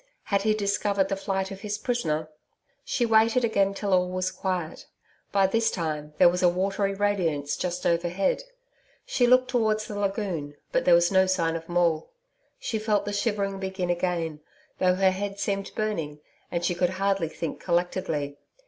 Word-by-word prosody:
Had 200 -1 +1
he 215 +1 +2
discovered 200 -1 0
the 195 - 0
flight 195 0 -2
of 195 0 -8
his 210 -1 -3
prisoner? 165 -10 -1 0.6
She 245 - 0
waited 225 +2 +4
again 200 -3 +1
till 200 -1 -1
all 180 0 +3
was 185 0 -1
quiet. 180 -4 -3 0.4
By 195 -1 +4
this 225 +4 +2
time, 150 -3 -4
there - - +7
was 180 +1 +2
a 180 - +6
watery 195 +2 0
radiance 175 -8 0
just 180 0 -3
overhead. 175 - +1 0.6
She 260 - +2
looked 255 +1 +5
towards 215 -3 +1
the 205 -1 -5
lagoon, 195 -8 -2 0.2
but - - +1
there 175 - +7
was 175 +1 +3
no 190 -1 +4
sign 170 -3 +1
of 165 0 -6
Maule. 170 -2 +1 0.5
She 230 -3 -3
felt 210 -2 +1
the 205 - -3
shivering 200 -2 -1
begin 190 -2 -2
again, 170 -3 -1 0.4
though 180 0 +3
her 190 0 +4
head 200 +1 -4
seemed 195 -1 -1
burning, 165 -9 -2 0.3
and 170 0 -2
she 175 - +1
could 175 0 +1
hardly 195 -3 +1
think 165 -1 -5
collectedly. 170 -5 -1
190 Hz, 175 wpm, -26 LUFS, 175-205 Hz, 0.6 s, there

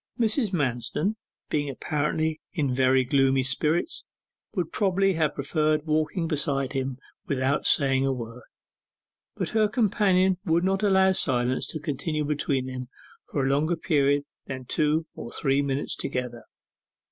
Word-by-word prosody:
Mrs. 225 -1 +1
Manston, 150 - -1 0.4
being 145 -1 0
apparently 155 +3 -1
in 145 -7 0
very 130 0 +3
gloomy 135 0 +3
spirits, 155 - 0 0.5
would 180 -4 -1
probably 195 -1 +2
have 155 -3 0
preferred 155 +1 0
walking 155 +2 0
beside 140 -3 -1
him 135 -1 -2 0.3
without 140 -1 0
saying 135 -1 +3
a - - +2
word: 120 -1 -6 0.9
but - - -2
her 215 -1 +3
companion 190 -5 +2
would 165 +1 +2
not 190 +1 +1
allow 190 -2 +4
silence 130 -8 +1
to 155 - -4
continue 150 +1 -2
between 140 -3 -1
them 130 -1 -6 0.4
for 140 -2 -1
a - - +1
longer 155 +5 +2
period 145 -3 +2 0.2
than 130 -1 -6
two 155 +4 +1
or 120 - -8
three 135 -1 +1
minutes 140 0 -1
together. 125 -3 -4
150 Hz, 140 wpm, -26 LUFS, 135-170 Hz, 0.9 s, allow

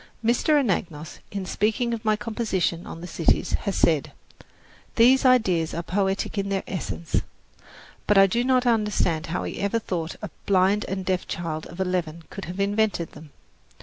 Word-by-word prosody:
Mr. 290 +6 +3
Anagnos, 170 - -2
in 200 -2 -4
speaking 225 +5 0
of 230 -1 -4
my 215 -1 +3
composition 210 -5 -2
on 165 - -8
the - - -6
cities, 165 -2 +1 0.2
has 195 - -2
said, 155 -4 +2 0.8
"These 255 +3 +5
ideas 190 -11 +3
are 170 - -3
poetic 195 +3 -1
in 200 0 -2
their 195 -1 -1
essence." 95 - -2 0.9
But 210 - +4
I 195 - +8
do 235 +5 +1
not 255 0 +2
understand 210 -9 +1
how 170 +2 -2
he - - -5
ever 200 +3 0
thought 170 -7 -3
a 205 - -5 0.2
blind 195 +2 +3
and 190 -1 -3
deaf 185 -1 -1
child 160 -2 -4
of 170 - -12
eleven 175 -3 -2
could 195 - -6
have 180 +3 -7
invented 205 -3 0
them. 155 - -13
195 Hz, 170 wpm, -25 LUFS, 170-215 Hz, 0.9 s, I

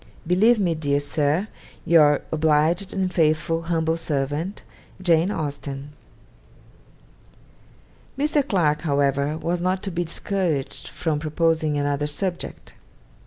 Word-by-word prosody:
'Believe 205 +8 +4
me, 180 -4 +1
dear 145 -3 0
Sir, 150 +6 0 0.4
'Your 150 -4 +5
obliged 160 +4 +2
and 185 -2 -1
faithful 165 0 +1
humbl 165 -1 0
Sert. 150 +5 -2 0.4
'JANE 175 -1 +3
AUSTEN.' 145 -4 -5 2.2
Mr. 290 0 +1
Clarke, 155 - +1
however, 140 -1 +1
was 170 +2 -2
not 185 +2 0
to 195 - -3
be 175 0 -1
discouraged 165 -6 -2
from 155 -3 -2
proposing 155 -1 0
another 145 0 0
subject. 175 +4 -4
160 Hz, 110 wpm, -23 LUFS, 145-175 Hz, 2.2 s, Your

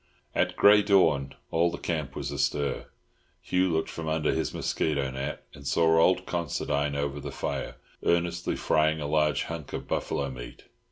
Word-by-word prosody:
At - - +1
grey 105 +1 +7
dawn 80 -10 +3 0.2
all 85 +1 +3
the 85 - -5
camp 75 -6 -3
was - - -4
astir. 70 -1 -1 0.5
Hugh 90 0 +1
looked 80 0 -1
from 80 -1 -6
under 80 -1 +1
his - - -1
mosquito 70 -4 -1
net, 65 +1 -5
and 70 0 -10
saw 80 +3 +4
old 90 +2 +3
Considine 75 -3 -1
over 70 0 -2
the - - -6
fire, - - -4 0.3
earnestly 85 0 +1
frying 80 0 +2
a 75 - -3
large 75 -2 +2
hunk 80 -4 -7
of - - -5
buffalo 70 -1 -1
meat. - - -9
80 Hz, 165 wpm, -28 LUFS, 70-85 Hz, 0.5 s, grey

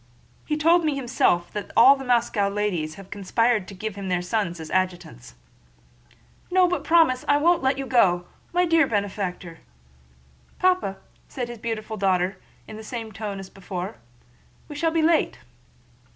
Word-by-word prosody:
He 300 - 0
told 335 +3 +4
me 305 -2 0
himself 240 -9 +1
that 210 -1 -5
all 260 +4 +8
the 270 - -8
Moscow 235 -5 +1
ladies 190 -7 -2
have 195 -1 -13
conspired 210 +1 0
to 200 - -10
give 215 +3 -5
him 200 0 -7
all - - -4
their 180 -1 0
sons 180 -3 -2
as 160 -1 -8
adjutants." 175 - -3 1.1
"No, 365 0 +4
but 360 0 -1
do - - -15
promise! 325 -7 +4
I 285 - +4
won't 340 +4 +3
let 265 0 +1
you 275 - -3
go! 180 -9 +3 0.3
My 355 +1 +2
dear 330 -3 +3
benefactor..." 195 -5 -3 1.0
"Papa," 365 - +1 0.3
said 245 -2 -5
his 240 -2 -8
beautiful 220 -1 -4
daughter 190 -1 +1 0.3
in 215 - -9
the 220 - -9
same 225 -1 -6
tone 205 -1 -5
as 195 -1 -9
before, 185 - -6 0.7
"we 300 - -8
shall 325 +3 +1
be 320 0 0
late." 325 0 +2
215 Hz, 170 wpm, -24 LUFS, 190-275 Hz, 1.1 s, all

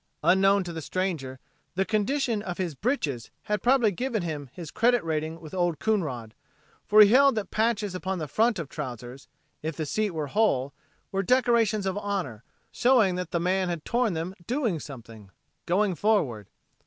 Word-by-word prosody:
Unknown 195 +2 +4
to 175 -1 -6
the 160 - -5
stranger 155 -7 -3 0.4
the 190 +1 +1
condition 225 +2 0
of 180 -4 -5
his 180 -4 -2
"britches" 145 - -2
had 210 -2 -1
probably 245 -4 +4
given 230 0 -2
him 150 -5 -5
his 165 -4 -9
credit 240 +2 +2
rating 160 0 -2
with 155 -2 -11
Old 175 -3 0
Coonrod, 145 - -2 0.5
for 215 +1 +7
he 205 - +8
held 275 +2 +5
that 215 -2 -3
patches 215 -3 0
upon 185 +1 -3
the 155 -3 -4
front 225 - +2
of 165 -4 -4
trousers, 125 -2 -7 0.3
if 160 0 -4
the 155 - -2
seat 215 +8 0
were 160 -4 -3
whole, 140 -7 +1 0.4
were 195 - 0
decorations 230 -2 +2
of 190 +1 -1
honor, 185 - -3 0.3
showing 240 -7 +3
the 180 -1 -2
man 185 +1 +1
had 170 -3 -4
torn 240 -4 +1
them 165 +3 -3
doing 240 - 0
something, 115 -8 -11 0.4
going 190 +2 +2
forward. 150 - 0
185 Hz, 170 wpm, -27 LUFS, 155-215 Hz, 0.5 s, he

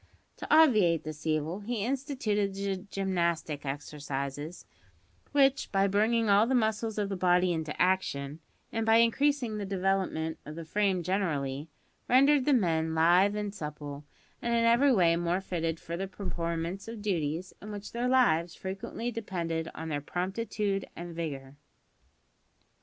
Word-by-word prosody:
To - - -7
obviate 215 - +5
this 155 0 -7
evil 155 +4 0
he 215 0 -3
instituted 240 -7 -1
the 195 -1 -2
gymnastic 170 -7 -1
exercises, 145 +2 -5 0.7
which, 280 0 +3
by 195 0 +3
bringing 220 +3 +2
all 205 +2 +5
the 260 - +2
muscles 220 -1 0
of 205 -1 0
the 195 - -3
body 180 -1 +3
into 160 -2 -4
action, 160 -6 0 0.3
and 225 - -1
by 225 0 +4
increasing 235 0 +2
the - - -3
development 190 -4 -1
of 150 - -8
the 165 0 -7
frame 195 0 +1
generally, 155 -6 -1 0.4
rendered 275 +2 +5
the 295 - +3
men 160 -8 +1
lithe 175 +5 +4
and 210 -1 -3
supple, 150 -5 -7 0.4
and 235 0 0
in 230 0 +3
every 240 +5 +5
way 175 -8 +4
more 175 +1 0
fitted 165 -4 -3
for 170 - -5
the 195 +3 -3
performance 170 -1 -4
of 225 -2 -7
duties 170 -2 -2
in 210 - -8
which 205 0 -7
their 240 +1 -1
lives 175 -10 +3
frequently 195 +5 -5
depended 170 -7 -3
on 160 0 -5
their 145 -2 -2
promptitude 195 +4 -2
and 175 0 -7
vigour. 140 -4 -5
190 Hz, 150 wpm, -29 LUFS, 160-220 Hz, 0.7 s, obviate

